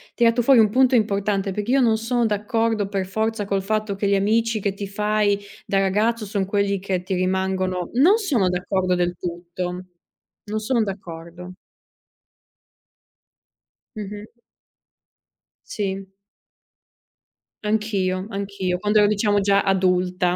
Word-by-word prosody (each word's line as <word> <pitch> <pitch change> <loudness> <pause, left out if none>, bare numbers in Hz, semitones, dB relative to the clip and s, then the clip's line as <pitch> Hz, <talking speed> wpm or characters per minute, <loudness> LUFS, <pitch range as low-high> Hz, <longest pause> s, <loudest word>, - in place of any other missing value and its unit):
tirato 235 0 +3
fuori 255 0 +5
un 215 - +4
punto 255 +3 +4
importante 200 -2 0
perché 210 +5 -3
io 270 0 +4
non 225 -2 +3
sono 235 +2 0
d'accordo 220 0 0
per 195 -1 -2
forza 220 +2 -2
col 195 -1 -1
fatto 215 0 -1
che 200 +1 -1
gli 200 - +3
amici 220 +2 +1
che 195 -1 -1
ti 200 0 -6
fai 210 0 +1 0.3
da 195 - +1
ragazzo 210 +4 +1
son 200 -1 -1
quelli 200 0 0
che 185 -2 -2
ti 190 0 -2
rimangono, 185 -1 -1
non 340 - +6
sono 280 - +1
d'accordo 180 0 0
del 175 0 0
tutto. 180 +1 -5 0.6
Non 215 +1 -2
sono 230 +1 +1
d'accordo. 180 -2 -8 2.4
Mh-mh. 210 0 -7 1.4
Sì. 195 -2 -3 1.6
Anch'io, 200 -4 0
anch'io 195 -3 -3
quando 210 +2 +2
ero 205 - +5
diciamo 205 0 +2
già 200 0 +3
adulta. 180 -1 +1
200 Hz, 130 wpm, -22 LUFS, 185-215 Hz, 2.4 s, non